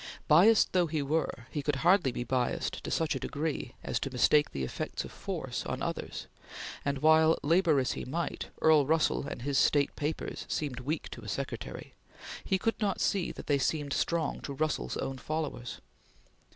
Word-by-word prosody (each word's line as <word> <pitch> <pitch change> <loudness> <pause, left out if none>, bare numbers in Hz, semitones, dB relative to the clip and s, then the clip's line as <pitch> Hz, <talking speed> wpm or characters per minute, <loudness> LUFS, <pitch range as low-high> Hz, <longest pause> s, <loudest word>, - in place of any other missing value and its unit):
Biassed 195 +9 +6
though 180 -2 +3
he 155 -2 -1
were, 140 -5 -1
he 150 - -2
could 145 0 0
hardly 175 -7 +5
be 120 - -3
biassed 125 0 -1
to - - -4
such 160 -3 +1
a - - -3
degree 145 -4 -3
as - - -1
to 135 - -3
mistake 145 +3 +4
the 70 - -4
effects 65 - -3
of - - -10
force - - -4
on - - -3
others, - - -4 0.6
and 140 0 -2
while 160 +1 +6
labor 165 -1 +4
as 130 - 0
he - - -4
might 165 +6 -3 0.2
Earl 155 -3 +6
Russell 155 -2 +2
and 120 - -6
his 140 0 +1
state 145 -1 +3
papers 150 +1 -3
seemed 140 -5 -2
weak 145 +5 -3
to 120 - -9
a 105 - -10
secretary, 115 - -5 0.5
he 190 - +1
could 225 +4 -1
not 200 -3 0
see 195 -3 +1
that - - -9
they 145 -2 +2
seemed 145 0 0
strong 170 -3 0
to 140 - -5
Russell's 155 +3 -1
own 135 -1 -3
followers. 150 -4 -4
150 Hz, 185 wpm, -30 LUFS, 135-160 Hz, 0.6 s, Biassed